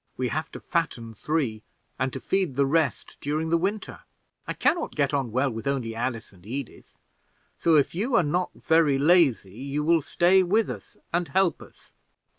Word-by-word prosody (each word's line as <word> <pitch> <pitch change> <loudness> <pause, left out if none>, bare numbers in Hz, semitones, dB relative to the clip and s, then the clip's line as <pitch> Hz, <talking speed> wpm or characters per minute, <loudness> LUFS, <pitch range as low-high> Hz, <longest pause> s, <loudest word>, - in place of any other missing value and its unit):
We 125 -1 -1
have 155 +4 -3
to - - -7
fatten 125 -10 -2
three, 125 -3 -2 0.4
and 130 0 0
to 135 - -6
feed 185 -3 -1
the 140 +1 +3
rest 155 +2 0
during 155 +3 -1
the - - +4
winter. 195 +4 -3 0.5
I - - -2
can - - +3
not 340 -1 -5
get 140 -1 +1
on 135 -5 -1
well 130 +3 +1
with 115 +4 -6
only 130 -5 -1
Alice 115 -2 -4
and 90 -2 -20
Edith; 125 +5 -7 0.6
so 165 -1 +4
if 145 -3 +3
you 225 +8 -1
are 205 - +5
not 175 +5 0
very 160 -4 +3
lazy, 140 - +3
you 140 +2 -2
will 165 +1 +3
stay 175 +6 +3
with 205 +5 +1
us - - -10 0.2
and 175 0 +1
help 190 -4 +1
us." - - -16
150 Hz, 190 wpm, -26 LUFS, 130-170 Hz, 0.6 s, are